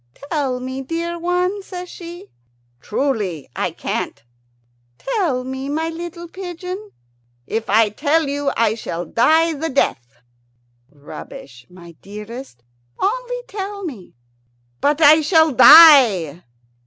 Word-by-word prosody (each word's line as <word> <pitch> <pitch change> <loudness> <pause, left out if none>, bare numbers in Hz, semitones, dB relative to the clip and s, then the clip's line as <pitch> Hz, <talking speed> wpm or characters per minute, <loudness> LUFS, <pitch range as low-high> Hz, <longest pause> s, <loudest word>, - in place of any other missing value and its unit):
"Tell 275 -6 -1
me, 260 +1 -6
dear 335 +4 -4
one," 360 +3 -1
says 360 -2 -8
she. 345 - -11 0.5
"Truly, 205 - -3
I - - -1
can't." 110 - -5 0.7
"Tell 275 - -2
me, 265 +1 -6
my 320 +3 -2
little 340 +1 -8
pigeon." 365 +3 -8 0.6
"If 225 - -4
I 215 +1 +4
tell 295 +8 0
you 285 0 -2
I 225 -2 +2
shall 175 -6 -5
die 320 - +2
the 320 +2 -4
death." 120 - -1 0.7
"Rubbish, 140 -3 -12
my 175 -1 -14
dearest; 210 - -10 0.3
only - - -2
tell 400 0 -6
me." 245 - -9 0.6
"But 295 +2 0
I 310 +1 +7
shall 320 0 +3
die." 235 - +7
285 Hz, 115 wpm, -19 LUFS, 220-340 Hz, 0.7 s, I